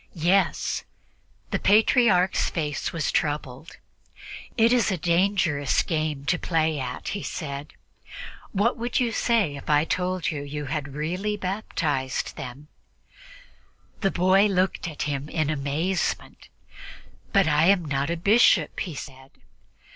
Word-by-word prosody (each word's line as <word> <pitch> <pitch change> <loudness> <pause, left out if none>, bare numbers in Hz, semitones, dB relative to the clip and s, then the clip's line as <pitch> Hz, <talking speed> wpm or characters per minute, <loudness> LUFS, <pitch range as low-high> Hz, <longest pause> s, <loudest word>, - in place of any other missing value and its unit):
"Yes." 175 +2 +1 0.7
The - - 0
Patriarch's 205 -3 +3
face 150 -4 -3
was 165 -3 -1
troubled. 145 -1 -3 0.8
"It 230 +1 +5
is 245 -3 +3
a 190 - 0
dangerous 170 -4 +1
game 155 -4 -2
to 180 +3 +1
play 160 -3 0
at," 125 -1 -5
he 200 - -3
said. 145 -2 -6 0.8
"What 215 +6 +1
would 240 +1 -1
you 240 -2 +1
say 220 -10 +1
if 140 - -10
I 150 +1 +4
told 180 0 -1
you 150 -3 -4
that 145 - -8
you 150 0 -4
had 145 -1 -4
really 180 +8 -2
baptized 160 -9 -2
them?" 135 +4 -8 1.3
The 195 - +1
boy 190 +3 +4
looked 185 -2 0
at 155 -3 -4
him 145 0 -3
in 155 -2 0
amazement. 155 +6 -2 0.8
"But 195 -4 +4
I 150 +1 +3
am 190 -3 +4
not 140 0 -1
a 170 - -1
bishop," 210 +8 +4
he 170 -6 -4
said. 135 -1 -9
165 Hz, 135 wpm, -25 LUFS, 145-195 Hz, 1.3 s, It